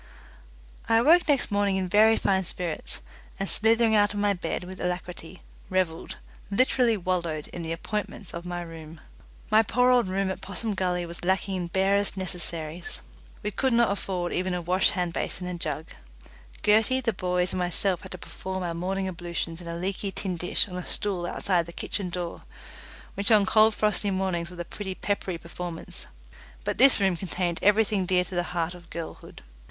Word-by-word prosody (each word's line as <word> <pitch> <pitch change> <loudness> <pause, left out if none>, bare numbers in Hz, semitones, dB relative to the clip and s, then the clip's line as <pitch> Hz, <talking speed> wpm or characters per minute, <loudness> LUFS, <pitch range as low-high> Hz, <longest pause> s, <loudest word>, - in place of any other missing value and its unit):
I 225 - +5
awoke 320 +10 +6
next 280 -6 +2
morning 200 -1 +2
in 190 -1 0
very 215 +4 +5
fine 190 -1 +2
spirits, 175 -2 -2 0.4
and 195 - -1
slithering 225 +1 +4
out 205 0 +3
of - - -2
my 205 0 +3
bed 180 -1 -3
with 185 +1 -8
alacrity, 180 0 -4 0.3
revelled 185 -3 -1 0.3
literally 240 +1 +3
wallowed 170 -5 -1
in 175 - -6
the 165 -1 -4
appointments 205 +3 -4
of 170 - -5
my 175 0 -4
room. 160 -1 -10 0.5
My 215 +1 +7
poor 250 +3 +3
old 245 -4 +4
room 190 +1 0
at - - -6
Possum 205 +3 -3
Gully 180 -2 0
was 170 +1 -9
lacking 190 +1 +1
in 180 -2 -2
barest 195 +2 +2
necessaries. 175 -3 -4 0.4
We 210 - -1
could 260 +4 +1
not 235 -2 +4
afford 185 -3 -2
even 185 0 0
a 175 - -2
wash 185 +3 +3
hand 180 -2 -1
basin 180 - -2
and 180 -1 -5
jug; 155 +1 -3 0.7
Gertie, 220 +5 +4
the 230 -3 +1
boys, 180 -1 0
and 185 - -1
myself 180 +1 +1
had - - -10
to - - -6
perform 190 +1 -5
our 170 -1 -2
morning 190 +3 -2
ablutions 175 -1 -4
in 170 - -9
a 170 0 -4
leaky 195 +2 -2
tin 190 -1 -2
dish 175 +3 +1
on 180 -2 -6
a 180 - -4
stool 185 -3 -2
outside 175 -3 +1
the - - -7
kitchen 190 +1 -2
door, 175 -1 -4 0.7
which 200 0 +1
on 210 -3 +6
cold 215 +2 +5
frosty 210 -1 +2
mornings 185 -3 -1
was 180 - -11
a 175 - -3
pretty 190 +1 -5
peppery 195 -3 -2
performance: 170 0 -7 0.6
but - - -2
this 270 -1 +7
room 190 -2 +3
contained 175 -1 -2
everything 205 -2 +3
dear 180 -1 +3
to 185 - -7
the 175 - +2 0.2
heart 170 +1 0
of 175 -1 -14
girlhood. 170 -1 -8
185 Hz, 185 wpm, -27 LUFS, 175-205 Hz, 0.7 s, My